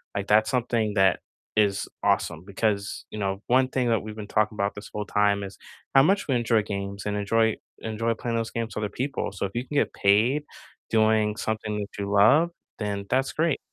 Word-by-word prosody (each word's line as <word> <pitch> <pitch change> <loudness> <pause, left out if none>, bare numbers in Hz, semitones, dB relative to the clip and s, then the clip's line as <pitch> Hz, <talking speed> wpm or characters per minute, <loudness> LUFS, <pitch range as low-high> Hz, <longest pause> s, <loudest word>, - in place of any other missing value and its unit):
like, 100 0 -2
that's 110 +1 +4
something 115 -4 0
that 95 -2 +4 0.4
is 100 -2 +2 0.2
awesome 80 +1 +1
because, 100 0 -2
you 105 - -6
know, 100 -1 -2
one 130 +1 +4
thing 125 -2 0
that 115 -2 +2
we've 110 0 -8
been 105 -2 -7
talking 105 0 +1
about 100 -1 -1
this 105 - -9
whole 105 0 -3
time 100 0 +2
is 95 0 -8 0.4
how 135 - +8
much 195 +5 +2
we 135 - +1
enjoy 115 -2 +2
games 100 -1 -5
and 105 0 -1
enjoy 110 +2 +2 0.3
enjoy 115 +1 -1
playing 115 +1 -3
those 115 0 -2
games 115 -2 -4
with 105 - -2
other 105 - -2
people, 130 -5 -2
so 100 - -3
if 95 - -5
you 120 +2 -2
can 150 - -6
get 145 - +2
paid 110 +9 +3 0.5
doing 110 -1 +3
something 110 -1 -2
that 100 -1 -7
you 100 0 -3
love, 110 +12 +5 0.3
then 100 -2 -3
that's 130 +1 +1
great. 160 -2 +1
110 Hz, 210 wpm, -26 LUFS, 100-115 Hz, 0.5 s, how